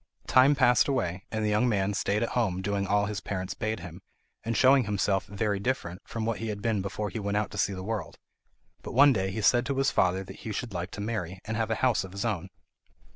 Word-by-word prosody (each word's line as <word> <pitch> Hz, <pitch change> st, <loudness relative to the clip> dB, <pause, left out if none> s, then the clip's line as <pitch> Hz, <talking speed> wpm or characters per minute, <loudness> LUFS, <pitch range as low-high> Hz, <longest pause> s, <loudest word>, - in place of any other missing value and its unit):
Time 135 Hz, +3 st, +5 dB
passed 125 Hz, -4 st, +4 dB
away, 95 Hz, -9 st, -1 dB
and 110 Hz, -1 st, -1 dB
the -, -, +1 dB
young 105 Hz, +4 st, +2 dB
man 100 Hz, -2 st, +1 dB
stayed 100 Hz, +2 st, 0 dB
at 115 Hz, -, -1 dB
home 95 Hz, -6 st, 0 dB
doing 100 Hz, 0 st, -1 dB
all 105 Hz, +1 st, +2 dB
his 105 Hz, 0 st, -3 dB
parents 95 Hz, -2 st, -4 dB
bade 110 Hz, -3 st, -3 dB
him, 85 Hz, 0 st, -9 dB, 0.4 s
and 115 Hz, 0 st, -1 dB
showing 130 Hz, -1 st, +5 dB
himself 100 Hz, -1 st, 0 dB
very 100 Hz, 0 st, -1 dB
different 100 Hz, -6 st, -2 dB
from 115 Hz, -1 st, -4 dB
what 115 Hz, -1 st, -1 dB
he 115 Hz, -, -4 dB
had 105 Hz, -2 st, -3 dB
been 105 Hz, -1 st, 0 dB
before 100 Hz, +1 st, -4 dB
he 115 Hz, -, -4 dB
went 100 Hz, 0 st, -1 dB
out 105 Hz, -1 st, -1 dB
to 100 Hz, -, -7 dB
see 95 Hz, +1 st, +1 dB
the 95 Hz, -1 st, -6 dB
world; 105 Hz, -4 st, -4 dB, 0.6 s
but -, -, -7 dB
one 140 Hz, +1 st, +7 dB
day 95 Hz, -3 st, -1 dB
he 95 Hz, +3 st, -4 dB
said 120 Hz, +4 st, +4 dB
to 135 Hz, +1 st, -2 dB
his 135 Hz, 0 st, +2 dB
father 95 Hz, +1 st, +2 dB
that 95 Hz, 0 st, -11 dB
he 110 Hz, -, -6 dB
should 110 Hz, +1 st, -4 dB
like 90 Hz, +1 st, -3 dB
to 105 Hz, -, -7 dB
marry, 100 Hz, -5 st, -3 dB
and 110 Hz, -, -3 dB
have 110 Hz, 0 st, -1 dB
a 110 Hz, -, +1 dB
house 125 Hz, -5 st, +2 dB
of 95 Hz, -1 st, -10 dB
his 100 Hz, +3 st, -3 dB
own. 105 Hz, -8 st, -2 dB
105 Hz, 250 wpm, -28 LUFS, 95-115 Hz, 0.6 s, one